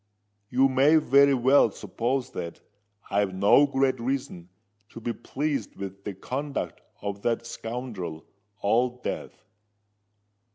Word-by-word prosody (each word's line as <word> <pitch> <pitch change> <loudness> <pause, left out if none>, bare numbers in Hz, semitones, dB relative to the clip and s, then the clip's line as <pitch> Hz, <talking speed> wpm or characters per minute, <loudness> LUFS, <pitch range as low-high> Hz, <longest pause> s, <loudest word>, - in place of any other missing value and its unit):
"You 130 +2 +4
may 135 +4 +4
very 140 -2 +5
well 130 0 +5
suppose 125 +5 -2
that 85 - -6 0.5
I've 100 -2 +1
no 100 +9 +5
great 135 -2 +1
reason 125 -8 -3 0.4
to - - -10
be 115 +1 -3
pleased 140 0 -3
with 100 0 -8
the 100 - -4
conduct 140 +8 -4 0.2
of 100 0 -4
that 115 +1 0
scoundrel 115 -10 -6 0.4
Old 125 +4 +1
Death." - - -5
125 Hz, 120 wpm, -27 LUFS, 100-135 Hz, 0.5 s, very